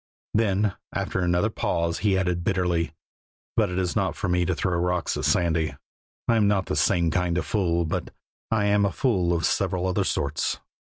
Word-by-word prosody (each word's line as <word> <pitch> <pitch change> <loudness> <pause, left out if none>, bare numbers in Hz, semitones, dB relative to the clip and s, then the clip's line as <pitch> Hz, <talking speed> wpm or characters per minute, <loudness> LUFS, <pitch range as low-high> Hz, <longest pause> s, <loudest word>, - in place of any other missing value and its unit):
Then 105 -2 +2 0.2
after - - -2
another 90 +4 +1
pause 85 -4 -1
he 100 -3 +2
added 90 -2 0
bitterly: 90 -3 0 0.6
"But 110 -4 +2
it 90 - -3
is 90 -2 -1
not - - 0
for - - -3
me 90 0 +2
to - - 0
throw 90 -2 -1
rocks 90 -1 0
at - - -2
Sandy. 80 -2 +1 0.5
I 115 -2 +4
am 105 -2 +4
not 100 -2 +2
the - - -2
same 85 -4 +2
kind 90 0 0
of - - -1
fool, 85 -5 +1
but 80 - -3 0.4
I 110 -2 +1
am 100 0 +3
a 100 - +2
fool 95 -10 +1
of 85 -2 +1
several 90 -1 0
other 90 -1 +1
sorts." 70 +1 -1
90 Hz, 190 wpm, -25 LUFS, 85-100 Hz, 0.6 s, I